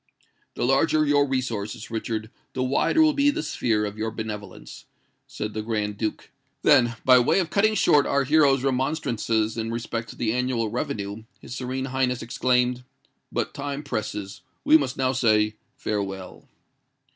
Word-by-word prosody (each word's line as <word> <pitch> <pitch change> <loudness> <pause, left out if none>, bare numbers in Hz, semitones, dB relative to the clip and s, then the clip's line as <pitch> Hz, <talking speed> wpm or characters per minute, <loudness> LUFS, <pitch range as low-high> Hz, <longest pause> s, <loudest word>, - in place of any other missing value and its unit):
"The - - -1
larger 155 +4 +3
your 145 -1 +3
resources, 120 -4 -3
Richard, 110 -1 -3 0.2
the 130 - -1
wider 140 - +3
will 310 -1 +4
be 285 0 +3
the 310 +2 -1
sphere 105 -3 0
of 105 +1 -6
your 110 +1 -1
benevolence," 105 -3 -7 0.4
said 105 0 -5
the 110 - -3
Grand 105 -2 -2
Duke; 110 -2 -3 0.3
then, 120 -5 +5
by 130 -1 +7
way 120 - +3
of 180 -4 0
cutting 215 +2 +3
short 145 -8 +4
our 140 0 +2
hero's 140 -2 +4
remonstrances 125 -5 0
in 115 0 -2
respect 115 0 -4
to - - -9
the 115 -2 -1
annual 125 -3 0
revenue, 110 -4 -4
his - - -9
Serene 130 +1 -3
Highness 130 -2 -1
exclaimed, 125 +1 +1 0.5
"But - - -2
time 145 +1 -4
presses: 105 -5 -4 0.2
we 155 - +5
must 135 -4 +2
now 130 -1 +1
say 110 -4 +2 0.2
farewell." 95 -3 -4
125 Hz, 155 wpm, -25 LUFS, 110-135 Hz, 0.5 s, by